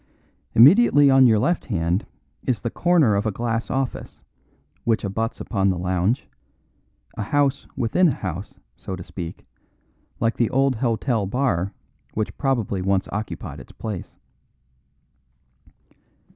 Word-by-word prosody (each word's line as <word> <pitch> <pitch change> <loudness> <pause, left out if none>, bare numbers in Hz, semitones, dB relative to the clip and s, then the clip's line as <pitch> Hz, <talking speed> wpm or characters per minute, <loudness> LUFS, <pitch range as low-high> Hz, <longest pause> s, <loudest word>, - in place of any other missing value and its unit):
Immediately 145 - +7
on 135 -1 +7
your 110 -2 +4
left 170 +11 0
hand 90 -3 -1 0.4
is 125 - 0
the 115 - -2
corner 170 -10 +3
of 100 +2 0
a - - +1
glass 115 +2 -2
office, 135 -1 -3 0.6
which 115 -1 +1
abuts 110 +3 -2
upon 100 -3 0
the 90 - 0
lounge 90 +7 0 0.9
a - - -2
house 140 +5 0
within 150 +11 +3
a 145 - +1
house, 95 +1 -6 0.2
so 95 - -6
to 90 - -8
speak, 85 -1 -8 0.7
like 115 0 0
the 120 - +2
old 135 -1 +2
hotel 115 -3 0
bar 100 -6 0 0.4
which 110 -1 -2
probably 120 -8 0
once 95 0 +1
occupied 105 +1 -5
its - - -13
place. 105 -5 -6
115 Hz, 130 wpm, -23 LUFS, 95-135 Hz, 0.9 s, Immediately